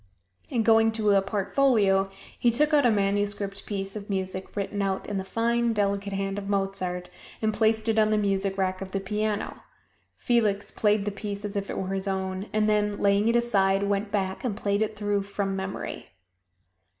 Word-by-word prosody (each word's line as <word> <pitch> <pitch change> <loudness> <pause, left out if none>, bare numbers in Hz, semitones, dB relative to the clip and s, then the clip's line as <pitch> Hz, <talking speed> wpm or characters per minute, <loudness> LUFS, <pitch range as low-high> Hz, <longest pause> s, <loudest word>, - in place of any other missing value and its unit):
And 230 -4 0
going 225 0 +5
to 215 -2 +2
a 195 -1 +5
portfolio 200 -1 +2 0.3
he 240 - +4
took 300 +6 +2
out 285 -4 +5
a - - +4
manuscript 200 -1 0
piece 195 -1 -4
of 210 -1 -7
music 190 -1 -3
written 205 0 -2
out 195 -1 -1
in 205 - -2
the - - -3
fine, 235 +3 +1
delicate 200 -1 0
hand 195 +1 -2
of 200 0 -7
Mozart, 195 -3 -2 0.3
and 215 -1 0
placed 220 +1 +2
it 225 -1 +3
on 215 0 +4
the 215 - +2
music 195 -1 0
rack 185 -1 -1
of 190 -1 -7
the 195 - 0
piano. 210 +2 -2 0.6
Felix 215 -4 +1
played 210 -1 +2
the 205 - -1
piece 200 0 -5
as 205 - -5
if 200 0 -2
it - - -4
were 190 0 -2
his 195 +1 -2
own; 190 +1 -2
and 215 0 +2
then 210 -1 +1
laying 200 +1 +3
it 230 - +3
aside, 195 -5 +2
went 200 +1 0
back 190 -2 -2
and 225 -6 -2
played 200 -1 0
it 220 0 -1
through 205 -1 0
from 200 0 -3
memory. 190 0 -5
200 Hz, 195 wpm, -26 LUFS, 195-215 Hz, 0.6 s, going